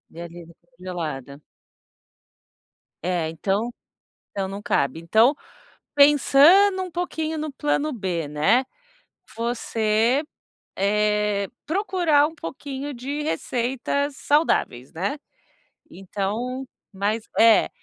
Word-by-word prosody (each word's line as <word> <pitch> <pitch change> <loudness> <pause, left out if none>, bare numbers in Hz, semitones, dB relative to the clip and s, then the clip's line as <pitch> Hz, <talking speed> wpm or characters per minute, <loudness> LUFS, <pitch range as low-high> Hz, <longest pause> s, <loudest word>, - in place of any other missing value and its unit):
E 170 - -7
ai 170 0 -9 0.3
congelada. 155 -7 -6 1.6
É, 175 -3 -1
então 195 +8 -1 0.7
não, 195 -1 -1
não 195 +1 -6
cabe. 140 -5 0
Então, 220 - +4 0.6
pensando 295 +7 +6
um 365 - -6
pouquinho 320 -2 -3
no 305 -1 -4
plano 295 +1 -1
B, 180 - -3
né, 175 - +2 0.7
você, 230 +1 +1 0.5
eh, 210 0 +1 0.2
procurar 345 -5 +2
um 320 - -12
pouquinho 280 - -6
de 275 +5 -4
receitas 270 0 -2
saudáveis, 275 - +1
né, 195 - -3 0.7
então, 210 +7 -4 0.3
mas 205 +3 -1 0.2
é. 225 -1 +6
230 Hz, 95 wpm, -23 LUFS, 190-290 Hz, 1.6 s, pensando